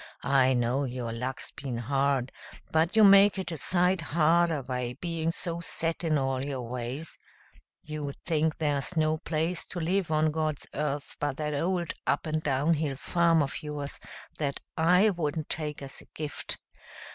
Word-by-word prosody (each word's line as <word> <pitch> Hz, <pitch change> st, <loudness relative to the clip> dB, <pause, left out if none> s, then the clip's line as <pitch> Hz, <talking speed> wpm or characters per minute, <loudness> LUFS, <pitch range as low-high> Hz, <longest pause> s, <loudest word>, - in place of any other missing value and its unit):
I 130 Hz, -1 st, +4 dB
know 120 Hz, +3 st, +1 dB
your 125 Hz, -3 st, -3 dB
luck's 125 Hz, +3 st, -4 dB
been 130 Hz, -4 st, -5 dB
hard, 135 Hz, +1 st, 0 dB, 0.4 s
but 160 Hz, +5 st, +2 dB
you 220 Hz, -, +7 dB
make 200 Hz, 0 st, +7 dB
it 190 Hz, -2 st, -3 dB
a 165 Hz, -, -4 dB
sight 180 Hz, +2 st, +3 dB
harder 160 Hz, -1 st, +2 dB
by 125 Hz, -1 st, -3 dB
being 165 Hz, -2 st, -2 dB
so 170 Hz, 0 st, -2 dB
set 165 Hz, 0 st, -1 dB
in 155 Hz, -2 st, +2 dB
all 135 Hz, -1 st, 0 dB
your 135 Hz, -3 st, -3 dB
ways. 125 Hz, +6 st, -5 dB, 0.6 s
You 150 Hz, -2 st, -4 dB
think 160 Hz, -1 st, +1 dB
there's 145 Hz, +2 st, -1 dB
no 155 Hz, 0 st, +2 dB
place 165 Hz, +1 st, -1 dB
to 180 Hz, -, -5 dB
live 180 Hz, +2 st, 0 dB
on 155 Hz, 0 st, +2 dB
God's 155 Hz, -2 st, -2 dB
earth 145 Hz, -1 st, -2 dB
but 145 Hz, -2 st, -1 dB
that 150 Hz, -1 st, -2 dB
old 175 Hz, +3 st, 0 dB
up -, -, +1 dB
and 155 Hz, 0 st, -1 dB
down 145 Hz, +2 st, +2 dB
hill 150 Hz, -3 st, -1 dB
farm 165 Hz, +2 st, +3 dB
of 140 Hz, -, -4 dB
yours 150 Hz, -2 st, -4 dB, 0.4 s
that 140 Hz, -3 st, -1 dB, 0.2 s
I 180 Hz, +6 st, +5 dB
wouldn't 155 Hz, -3 st, -2 dB
take 150 Hz, -2 st, -3 dB
as 135 Hz, -, -6 dB
a -, -, -16 dB
gift. 150 Hz, -2 st, -3 dB
155 Hz, 170 wpm, -28 LUFS, 140-165 Hz, 0.6 s, you